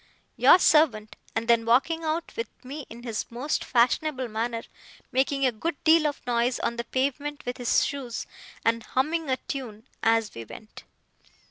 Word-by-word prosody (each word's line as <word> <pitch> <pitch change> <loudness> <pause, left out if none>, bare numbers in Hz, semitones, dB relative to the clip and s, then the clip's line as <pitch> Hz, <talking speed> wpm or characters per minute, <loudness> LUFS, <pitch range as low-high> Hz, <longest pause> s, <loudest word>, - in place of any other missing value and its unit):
Your - - +7
servant,' 275 -12 +3 0.2
and 225 +1 -1
then 235 -1 +4
walking 275 +8 +2
out 320 +1 -2
with 230 -1 -3 0.2
me 280 +2 -7
in 235 +1 -11
his 230 -3 -3
most 255 +6 -2
fashionable 255 +2 +1
manner, 230 +1 -2 0.5
making 275 +1 +1
a 255 - +3
good 295 +9 -3
deal 320 -1 +5
of 290 - -5
noise 240 +1 +1
on 235 - -1
the 235 - -2
pavement 285 +2 -2
with 245 0 -3
his 245 -2 +2
shoes, 265 -5 -4 0.4
and 230 0 +2
humming 300 +7 -1
a 260 - +2
tune 230 -7 -7
as 225 -1 +2
we 115 - -7
went. 215 - -12
250 Hz, 165 wpm, -26 LUFS, 230-290 Hz, 0.5 s, Your